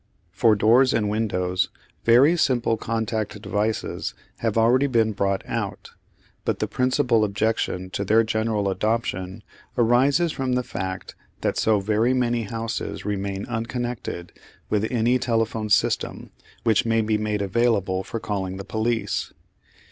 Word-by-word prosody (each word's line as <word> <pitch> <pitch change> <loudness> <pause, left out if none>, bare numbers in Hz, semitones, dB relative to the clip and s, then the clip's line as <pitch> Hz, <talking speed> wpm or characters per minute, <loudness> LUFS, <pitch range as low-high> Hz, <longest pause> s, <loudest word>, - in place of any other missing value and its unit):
For 110 +4 +4
doors 120 +5 +4
and 105 -2 +1
windows 90 -4 0 0.4
very 130 +8 +6
simple 125 -8 +2
contact 110 -1 -2
devices 105 +1 -2 0.2
have 115 -1 -1
already 125 +5 +4
been 115 -4 +2
brought 100 -1 -1
out, - - -4 0.5
but - - 0
the - - -1
principal 125 -3 +2
objection 100 -3 -1
to 100 - -2
their 110 +3 +4
general 110 -2 0
adoption 100 -1 -2 0.3
arises 135 +8 +3
from 130 -3 -2
the 125 0 +1
fact 95 -5 -5 0.3
that - - 0
so 110 -2 +2
very 110 +5 +1
many 120 -2 0
houses 115 +2 -4
remain 100 -1 -2
unconnected 120 -6 -4 0.4
with 105 +1 +1
any 120 +1 +2
telephone 115 -2 -1
system 100 - +1 0.3
which 110 -3 +3
may 115 -1 +2
be 110 0 0
made 105 -1 -1
available 100 -3 +1
for 115 - -5
calling 95 -3 -3
the 100 - -7
police. 110 -2 -1
110 Hz, 135 wpm, -24 LUFS, 100-120 Hz, 0.5 s, very